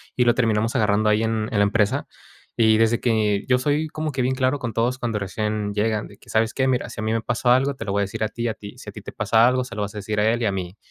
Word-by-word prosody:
Y 125 - +3
lo 120 0 +4
terminamos 115 -1 +1
agarrando 105 -2 +2
ahí, 105 +1 +2
en 110 0 -1
en 110 - -1
la - - +5
empresa. 105 0 +1 0.5
Y 110 -1 +5
desde 115 +1 +3
que, 105 -4 +1
yo 125 -1 +4
soy 150 +3 0
como 155 0 -3
que 130 -1 -2
bien 130 +1 0
claro, 130 +2 +1
con 120 -4 -4
todos 120 +3 0
cuando 115 -3 -2
recién 105 +1 -2
llegan, 105 0 0
de 100 - -16
que, - - -20
¿sabes 110 0 +1
qué?, 130 -1 +1
mira, 130 -2 0
si 110 - -7
a - - -3
mí 110 - 0
me 115 - 0
pasó 120 +2 -1
algo, 135 +3 +3
te - - -7
lo 100 - -2
voy 100 - +1
a - - +2
decir, 100 - -4
a - - +1
ti, 120 +1 -3
a - - -2
ti, 100 -1 -11
si - - -9
a - - -10
ti - - -9
te - - -8
pasa 115 +1 +3
algo, 130 0 +2
se 110 - -9
lo 105 - -3
vas 105 +1 -6
a - - -4
decir 105 +1 -2
a 105 - +3
él, 120 +1 -1
y - - +1
a - - +1
mí, 95 +1 -5
110 Hz, 325 wpm, -23 LUFS, 105-125 Hz, 0.5 s, la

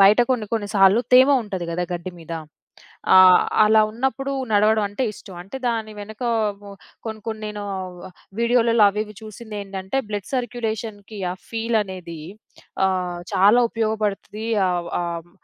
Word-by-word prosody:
బయట 205 +4 +7
కొన్ని 230 -5 0
కొన్ని 210 -3 -1
సార్లు 195 +3 +6
తేమ 260 +2 +8
ఉంటది 190 -5 -5
గదా! 175 +2 -2
గడ్డి 175 +1 -4
మీద, 165 0 -9 0.8
ఆహ్, 185 -1 +8 0.2
అలా 220 +1 +5
ఉన్నప్పుడు 265 +4 -2 0.2
నడవడం 210 +1 +4
అంటే 230 +6 -2
ఇష్టం. 190 -3 -12
అంటే 200 +9 -8
దాని 225 -2 -2
వెనకమో 215 -2 -3 0.3
కొన్ని 220 -1 -5
కొన్ని 220 -1 -5
నేను 210 -1 -6 0.8
వీడియోలలో 235 -2 +4
అవి, 210 +2 -1
ఇవి 210 - -13
చూసిందేంటంటే 205 -2 -6
బ్లడ్ 205 -2 -4
సర్క్యులేషన్‌కి 220 -4 -4
ఆ - - -6
ఫీల్ 230 0 0
అనేది 180 -5 -8 0.7
ఆహ్, 180 -2 -2
చాలా 205 +6 +5
ఉపయోగపడుతది 215 -1 -2 0.2
ఆహ్, 175 -1 -2
ఆహ్, 170 0 -5
210 Hz, 135 wpm, -22 LUFS, 190-225 Hz, 0.8 s, తేమ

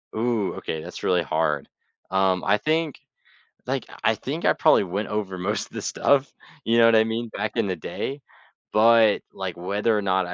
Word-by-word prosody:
Ooh, 110 -3 0
okay, 80 - -5
that's - - -9
really 90 -1 +2
hard. 75 -3 -1 0.4
Um, 95 -1 +2
I 105 - +3
think 155 +4 -1 0.7
Like, - - -2 0.2
I - - +3
think - - -5
I - - +5
probably - - +4
went 100 +3 -3
over 105 -3 -3
most 100 +4 -2
of - - -27
this - - -5
stuff, 140 0 +1 0.3
you 115 +1 +2
know 115 - +7
what 115 - +5
I 110 - +6
mean, 115 +1 -3
back 110 +2 -4
in 115 -3 +1
the 95 - -1
day, 135 - -5 0.5
but, 110 -1 +5
like, 95 -2 -5
whether 100 +5 0
or 105 - 0
not 95 -1 +1
I 90 - -5
105 Hz, 195 wpm, -24 LUFS, 95-115 Hz, 0.7 s, know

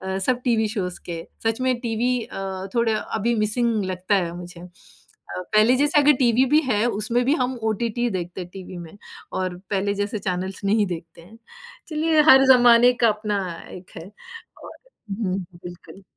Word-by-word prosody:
अ, - - -1
सब 250 -1 +1
TV 220 -2 +2
shows 180 -4 -3
के, 165 -1 -6 0.2
सच 225 +2 0
में 255 - +2
टीवी 235 +1 -1
अ, 190 0 -6
थोड़ा 230 -2 +2 0.2
अभी 235 +3 0
मिसिंग 215 0 0
लगता 185 +2 -1
है, 175 -3 0
मुझे। 175 -1 -9
अ, 180 0 -12
पहले 215 +4 +5
जैसा 290 +3 +3
अगर 295 +1 +5
टीवी 250 0 +3
भी 305 - +7
है 210 +3 +1 0.2
उसमें 240 +4 +1
भी 275 - +3
हम 255 +1 -1
ओटीटी 230 +2 -2
ही 240 - +1
देखते 180 -1 -5
हैं 180 - -9
टीवी 185 -1 -9
में 170 +3 -10 0.4
और 185 -1 -3
पहले 200 0 0
जैसे 205 +2 -3
चैनलस 185 0 -4
नहीं 210 +1 +2
देखते 165 0 -11
हैं। 220 +7 -16 0.5
चलिए 315 0 +2
हर 265 0 +8
ज़माने 245 0 +6
का 230 - +7
अपना 210 -1 -2 0.4
एक 180 - -19
है 180 +5 -10 0.5
और - - -10 0.4
हुँ, 195 -2 -2 0.3
बिल्कुल। 175 +2 -11
210 Hz, 180 wpm, -23 LUFS, 185-240 Hz, 0.5 s, हर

